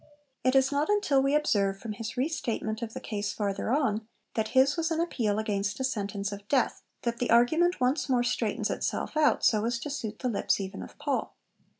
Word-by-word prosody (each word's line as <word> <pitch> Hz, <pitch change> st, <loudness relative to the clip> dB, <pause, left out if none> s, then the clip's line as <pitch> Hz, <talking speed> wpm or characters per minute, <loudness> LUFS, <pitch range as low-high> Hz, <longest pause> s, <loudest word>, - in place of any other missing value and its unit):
It 255 Hz, +1 st, +3 dB
is 270 Hz, 0 st, +4 dB
not 285 Hz, +4 st, 0 dB
until 400 Hz, -10 st, +3 dB
we 275 Hz, +2 st, +2 dB
observe 200 Hz, -10 st, +2 dB
from 215 Hz, +2 st, -6 dB
his 230 Hz, +3 st, -6 dB
re 260 Hz, +4 st, +2 dB
statement 225 Hz, -7 st, -3 dB
of 225 Hz, -1 st, -5 dB
the -, -, -3 dB
case 205 Hz, -2 st, -3 dB
farther 200 Hz, 0 st, -2 dB
on, 225 Hz, -5 st, +1 dB, 0.3 s
that 220 Hz, -1 st, 0 dB
his 270 Hz, +2 st, +5 dB
was 330 Hz, 0 st, 0 dB
an 325 Hz, -1 st, -1 dB
appeal 230 Hz, -11 st, 0 dB
'against 205 Hz, -1 st, -1 dB
a -, -, -1 dB
sentence 205 Hz, -5 st, -2 dB
of 200 Hz, 0 st, -8 dB
death,' 260 Hz, -1 st, +1 dB, 0.2 s
that 235 Hz, -1 st, -2 dB
the 245 Hz, -, -1 dB
argument 315 Hz, +10 st, +4 dB
once 260 Hz, +3 st, +1 dB
more 245 Hz, -2 st, +3 dB
straightens 245 Hz, -, -1 dB
itself -, -, -2 dB
out 305 Hz, -1 st, +3 dB
so 215 Hz, -2 st, +4 dB
as 235 Hz, +1 st, 0 dB
to 295 Hz, +5 st, -5 dB
suit 225 Hz, -6 st, -4 dB
the 255 Hz, -, -2 dB
lips 220 Hz, -3 st, +1 dB
even 195 Hz, 0 st, -5 dB
of -, -, -10 dB
Paul. 290 Hz, -2 st, -2 dB
240 Hz, 215 wpm, -28 LUFS, 210-280 Hz, 0.3 s, his